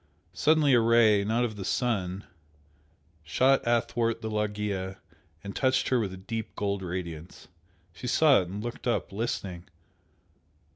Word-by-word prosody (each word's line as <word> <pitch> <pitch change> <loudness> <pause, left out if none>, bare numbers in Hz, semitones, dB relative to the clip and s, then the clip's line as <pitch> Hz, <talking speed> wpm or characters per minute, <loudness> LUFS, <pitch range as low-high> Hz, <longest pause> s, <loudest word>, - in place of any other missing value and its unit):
Suddenly 155 -2 +3
a 120 - +6
Ray, 115 -3 +4
not 115 +4 +1
of 110 -3 -5
the 100 - -5
sun, 100 -4 -1 1.0
shot 130 - +3
athwart 115 -1 0
the 110 - -3
loggia 105 -3 -2 0.5
and 100 0 -7
touched 130 -1 +1
her 130 - +3
with 105 -4 -2
a 95 - -8
deep 110 +3 -6
gold 100 -1 -2
radiance. 85 -2 -6 0.4
She 90 - -7
saw 140 0 +5
it 90 - -6
and 100 +4 -6
looked 120 +1 -6
up, 120 - -1
listening. 95 -5 -4
105 Hz, 145 wpm, -28 LUFS, 95-120 Hz, 1.0 s, a